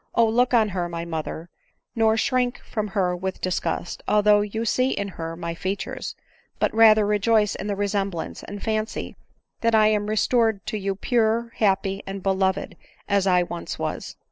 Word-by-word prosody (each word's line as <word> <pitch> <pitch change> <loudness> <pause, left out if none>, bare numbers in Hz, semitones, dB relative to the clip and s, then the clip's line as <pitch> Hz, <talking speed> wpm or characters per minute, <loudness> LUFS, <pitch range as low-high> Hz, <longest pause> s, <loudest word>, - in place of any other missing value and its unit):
O! 230 - +5
look 245 +3 +2
on 225 -4 +4
her, 175 -2 -2
my 170 0 -4
mother, 165 0 -5 0.4
nor 225 -1 +3
shrink 250 +1 +1
from 215 -1 -3
her 180 -2 +2
with 190 +1 -4
disgust, 175 -1 -2
although 210 0 +4
you 220 +2 -3
see 255 +3 +2
in 200 -5 -2
her 165 -2 -6
my 170 0 -4
features; 190 +4 -4 0.4
but - - 0
rather 220 -1 +6
rejoice 210 +1 +2
in 195 - -5
the 205 - -1
resemblance, 195 -3 -2
and 205 0 -8
fancy 215 0 -2 0.4
that 230 -1 +2
I 215 -1 +5
am 210 -1 0
restored 220 -1 +1
to 215 - -3
you 195 0 -2
pure, 230 +2 +1
happy, 195 -1 +1
and 195 -1 -6
beloved 190 -1 0 0.3
as 200 -1 +2
I 180 -1 +4
once 175 -1 -6
was. - - -4
205 Hz, 170 wpm, -24 LUFS, 190-220 Hz, 0.4 s, rather